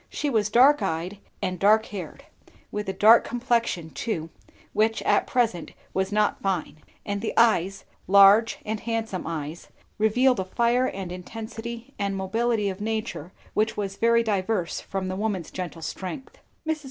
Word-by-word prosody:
She 290 Hz, -, -2 dB
was 215 Hz, -3 st, +1 dB
dark 270 Hz, +6 st, +5 dB
eyed 170 Hz, +5 st, -3 dB, 0.2 s
and 185 Hz, -2 st, -2 dB
dark 215 Hz, +2 st, +4 dB
haired; 195 Hz, -3 st, -8 dB, 0.5 s
with 210 Hz, -1 st, -3 dB
a -, -, +1 dB
dark 220 Hz, +4 st, +6 dB
complexion 235 Hz, -9 st, -1 dB
too, 165 Hz, -9 st, -4 dB, 0.4 s
which 220 Hz, +1 st, +1 dB
at -, -, +2 dB
present 225 Hz, -10 st, 0 dB, 0.2 s
was 190 Hz, +1 st, -1 dB
not 210 Hz, 0 st, +1 dB
fine; 185 Hz, -5 st, -2 dB, 0.3 s
and 200 Hz, -1 st, -2 dB
the 220 Hz, -, -3 dB
eyes, 195 Hz, -5 st, +3 dB, 0.2 s
large 200 Hz, +3 st, +6 dB
and 215 Hz, 0 st, -2 dB
handsome 225 Hz, -6 st, -3 dB
eyes, 160 Hz, 0 st, -5 dB, 0.3 s
revealed 245 Hz, +3 st, +3 dB
a -, -, 0 dB
fire 235 Hz, +6 st, +2 dB
and 190 Hz, -5 st, -5 dB
intensity 225 Hz, +6 st, -7 dB
and 200 Hz, -1 st, -1 dB
mobility 215 Hz, +3 st, 0 dB
of 195 Hz, +1 st, -4 dB
nature 220 Hz, -6 st, -3 dB, 0.2 s
which 215 Hz, +1 st, 0 dB
was 195 Hz, -2 st, -3 dB
very 230 Hz, +2 st, +3 dB
diverse 200 Hz, -4 st, -1 dB
from 195 Hz, -1 st, -4 dB
the 185 Hz, -, -3 dB
woman's 195 Hz, -5 st, -2 dB
gentle 175 Hz, -3 st, -6 dB
strength. 195 Hz, -, -6 dB, 0.3 s
Mrs. 315 Hz, 0 st, 0 dB
210 Hz, 155 wpm, -25 LUFS, 190-230 Hz, 0.5 s, dark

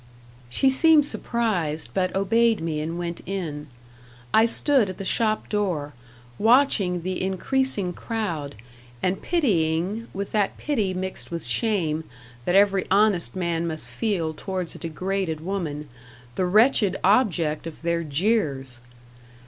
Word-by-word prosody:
She 265 Hz, -, +3 dB
seemed 310 Hz, +2 st, +5 dB
surprised, 190 Hz, -, -2 dB
but 185 Hz, -1 st, 0 dB
obeyed 225 Hz, +3 st, +3 dB
me 160 Hz, -2 st, -2 dB
and 165 Hz, +2 st, -4 dB
went 170 Hz, -1 st, -4 dB
in. 160 Hz, -6 st, -4 dB, 0.7 s
I 225 Hz, +1 st, +6 dB
stood 255 Hz, -3 st, +3 dB
at 185 Hz, -, -6 dB
the 195 Hz, -, -6 dB
shop 215 Hz, +1 st, 0 dB
door, 175 Hz, -9 st, -1 dB, 0.5 s
watching 220 Hz, -7 st, +3 dB
the 185 Hz, +1 st, -3 dB
increasing 195 Hz, +1 st, -1 dB
crowd, 170 Hz, -, -4 dB, 0.5 s
and 185 Hz, +1 st, 0 dB
pitying, 200 Hz, -, 0 dB
with 200 Hz, +1 st, -5 dB
that 205 Hz, -2 st, 0 dB
pity 215 Hz, -11 st, -1 dB
mixed 190 Hz, +1 st, -5 dB
with 170 Hz, -5 st, -5 dB
shame 160 Hz, -, 0 dB, 0.4 s
that 180 Hz, -, +1 dB
every 195 Hz, -1 st, +4 dB
honest 195 Hz, -, +3 dB
man 170 Hz, -2 st, -1 dB
must 155 Hz, -1 st, -2 dB
feel 185 Hz, -8 st, -1 dB
towards 185 Hz, +1 st, -4 dB
a -, -, -11 dB
degraded 180 Hz, 0 st, -2 dB
woman, 160 Hz, -4 st, -4 dB, 0.5 s
the 185 Hz, -, 0 dB
wretched 210 Hz, -1 st, +4 dB
object 180 Hz, -8 st, +2 dB
of 160 Hz, 0 st, -10 dB
their 170 Hz, 0 st, 0 dB
jeers. 145 Hz, -, 0 dB
185 Hz, 130 wpm, -24 LUFS, 165-215 Hz, 0.7 s, I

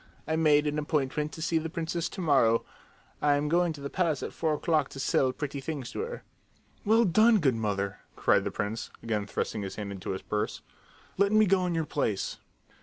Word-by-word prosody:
"I 160 Hz, -, +1 dB
made 150 Hz, -2 st, +4 dB
an 150 Hz, 0 st, 0 dB
appointment 150 Hz, 0 st, -1 dB
to 160 Hz, -, -6 dB
see 165 Hz, 0 st, +1 dB
the 160 Hz, +1 st, -4 dB
princess 165 Hz, 0 st, -2 dB
to 190 Hz, -, -6 dB
morrow. 125 Hz, -8 st, +3 dB, 0.6 s
I 145 Hz, -1 st, +4 dB
am 145 Hz, +1 st, 0 dB
going 175 Hz, +2 st, +2 dB
to 145 Hz, -, -10 dB
the 140 Hz, -, -4 dB
palace 165 Hz, -6 st, 0 dB
at -, -, -5 dB
four 160 Hz, -2 st, 0 dB
o'clock 155 Hz, -2 st, +1 dB
to 135 Hz, -, -9 dB
sell 130 Hz, 0 st, +2 dB
pretty 140 Hz, 0 st, -5 dB
things 135 Hz, -3 st, -5 dB
to -, -, -6 dB
her." 470 Hz, +2 st, -5 dB, 0.6 s
"Well 225 Hz, +2 st, +4 dB
done, 215 Hz, +5 st, +5 dB
good 145 Hz, -9 st, +3 dB
mother!" 100 Hz, -3 st, -2 dB, 0.2 s
cried -, -, +3 dB
the -, -, -1 dB
prince, 105 Hz, +3 st, -3 dB
again 105 Hz, -3 st, -1 dB
thrusting 105 Hz, -, -2 dB
his 95 Hz, -1 st, -5 dB
hand 105 Hz, -2 st, -5 dB
into 95 Hz, -2 st, -7 dB
his 95 Hz, -, -3 dB
purse. 105 Hz, 0 st, -2 dB, 0.6 s
"Let 200 Hz, 0 st, +4 dB
me 215 Hz, 0 st, +5 dB
go 185 Hz, -2 st, +2 dB
in 175 Hz, -, -1 dB
your 160 Hz, -1 st, 0 dB
place!" 110 Hz, -10 st, -2 dB
150 Hz, 210 wpm, -29 LUFS, 120-170 Hz, 0.6 s, done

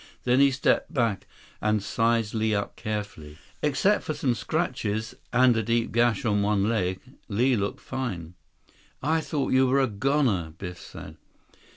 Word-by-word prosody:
Then 125 Hz, +1 st, +3 dB
he 140 Hz, 0 st, +6 dB
stepped 135 Hz, +2 st, +1 dB
back 115 Hz, -, 0 dB, 0.3 s
and 105 Hz, -1 st, +1 dB
sized 115 Hz, 0 st, +1 dB
Li 110 Hz, -1 st, +1 dB
up 100 Hz, -, -3 dB
carefully. 105 Hz, -9 st, -5 dB, 0.2 s
Except 150 Hz, +8 st, +2 dB
for 155 Hz, -, -3 dB
some 130 Hz, -3 st, +1 dB
scratches, 105 Hz, +1 st, -2 dB, 0.2 s
and 125 Hz, 0 st, +5 dB
a 110 Hz, -, +1 dB
deep 115 Hz, +1 st, 0 dB
gash 120 Hz, -2 st, +2 dB
on 105 Hz, -2 st, +2 dB
one 100 Hz, 0 st, +2 dB
leg, 95 Hz, -5 st, 0 dB, 0.3 s
Li 120 Hz, +5 st, +2 dB
looked 100 Hz, -2 st, -2 dB
fine. 95 Hz, -11 st, -4 dB, 0.7 s
"I 160 Hz, +3 st, +2 dB
thought 145 Hz, -4 st, -1 dB
you 130 Hz, 0 st, +5 dB
were 135 Hz, +2 st, +3 dB
a 135 Hz, -, +4 dB
goner," 115 Hz, -, 0 dB
Biff 90 Hz, -1 st, -7 dB
said. -, -, -10 dB
115 Hz, 160 wpm, -26 LUFS, 100-130 Hz, 0.7 s, he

